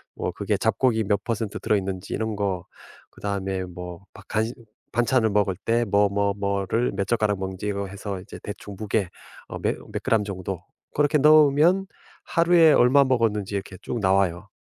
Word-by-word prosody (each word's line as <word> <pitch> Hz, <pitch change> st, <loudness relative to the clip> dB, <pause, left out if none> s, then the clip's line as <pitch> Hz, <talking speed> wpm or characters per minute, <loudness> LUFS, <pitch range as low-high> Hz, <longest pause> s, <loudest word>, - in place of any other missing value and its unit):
뭐 -, -, -3 dB
그게 -, -, -1 dB
잡곡이 110 Hz, -5 st, +1 dB
몇 100 Hz, 0 st, 0 dB
퍼센트 110 Hz, -3 st, -3 dB
들어 105 Hz, -, +1 dB
있는지 95 Hz, -1 st, -4 dB
이런 110 Hz, 0 st, -2 dB
거. 95 Hz, -3 st, -2 dB, 0.5 s
그다음에 95 Hz, -2 st, -3 dB
뭐 90 Hz, 0 st, -8 dB
바 100 Hz, -, -13 dB
간 110 Hz, +1 st, 0 dB, 0.5 s
반찬을 120 Hz, -1 st, +2 dB
먹을 100 Hz, -2 st, +1 dB
때 115 Hz, +1 st, +2 dB
뭐, 100 Hz, 0 st, +3 dB
뭐, 100 Hz, 0 st, +1 dB
뭐를 100 Hz, +4 st, 0 dB
몇 100 Hz, 0 st, -1 dB
젓가락 105 Hz, -4 st, +1 dB
먹는지 95 Hz, +1 st, -4 dB
이거 100 Hz, -1 st, -2 dB
해서 100 Hz, 0 st, -6 dB
이제 -, -, -10 dB
대충 105 Hz, -1 st, -8 dB
무게 105 Hz, -3 st, -1 dB, 0.4 s
어 -, -, -6 dB
며 -, -, +1 dB, 0.2 s
몇 -, -, -4 dB
그램 110 Hz, -2 st, +2 dB
정도 95 Hz, -2 st, -5 dB, 0.3 s
그렇게 150 Hz, 0 st, +3 dB
넣으면 155 Hz, +5 st, +5 dB, 0.4 s
하루에 170 Hz, -2 st, +5 dB
얼마 130 Hz, +3 st, +5 dB
먹었는지 110 Hz, -6 st, 0 dB
이렇게 95 Hz, -1 st, -5 dB
쭉 120 Hz, -, -4 dB
나와요. 95 Hz, -2 st, +1 dB
105 Hz, 330 characters per minute, -24 LUFS, 95-120 Hz, 0.5 s, 넣으면